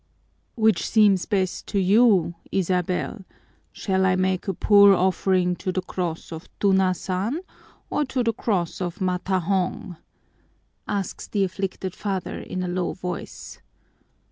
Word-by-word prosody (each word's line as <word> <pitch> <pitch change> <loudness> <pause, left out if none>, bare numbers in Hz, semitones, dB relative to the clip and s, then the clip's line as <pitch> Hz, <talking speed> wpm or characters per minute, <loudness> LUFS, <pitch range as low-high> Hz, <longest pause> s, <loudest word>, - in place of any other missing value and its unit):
"Which 220 -2 +2
seems 205 -4 +4
best 190 -4 -1
to 200 - 0
you, 195 -3 +4 0.2
Isabel, 185 +2 -1 0.5
shall 190 -2 -1
I 185 -1 +3
make 185 0 0
a 195 - 0
poor 200 0 +6
offering 185 0 +1
to 185 - -3
the 185 0 -2
cross 175 -4 -4
of 160 +1 -8
Tunasan 190 - +1 0.5
or 295 - 0
to 260 -1 -1
the 230 -1 +1
cross 190 -6 -2
of 175 +2 -4
Matahong?" 185 -1 -1 0.9
asks 200 -2 -3
the 200 -2 0
afflicted 190 0 -3
father 195 -3 -4
in 185 - -5
a - - -2
low 180 0 -2
voice. 180 -2 -7
190 Hz, 130 wpm, -24 LUFS, 180-200 Hz, 0.9 s, poor